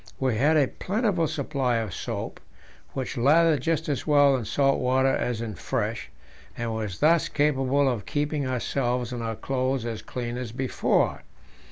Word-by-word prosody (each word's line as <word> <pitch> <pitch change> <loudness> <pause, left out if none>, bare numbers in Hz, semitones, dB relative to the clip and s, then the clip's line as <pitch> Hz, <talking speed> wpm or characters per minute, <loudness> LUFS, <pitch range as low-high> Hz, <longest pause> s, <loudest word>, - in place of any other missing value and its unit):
We 130 -4 +1
had 150 +8 +3
a 140 -3 +4
plentiful 195 - 0
supply 135 -4 -1
of 110 -5 -2
soap, - - -5 0.5
which 130 0 -4
lathered 155 +4 +4
just 165 -2 0
as 145 -1 -2
well 145 -2 +5
in 125 -4 -3
salt 135 +5 +2
water 130 +1 +2
as 120 -2 -2
in 115 -2 -4
fresh, 90 - -3 0.5
and 115 -1 -2
was 105 -4 -4
thus 165 +2 +4
capable 140 -1 +2
of 120 -6 -2
keeping 145 -1 -1
ourselves 125 -1 -1
and 120 - -4
our 115 -1 -3
clothes 130 +1 -1
as 115 -2 -4
clean 120 -1 -5
as 120 -3 -5
before. 130 +1 0
130 Hz, 165 wpm, -26 LUFS, 120-145 Hz, 0.5 s, well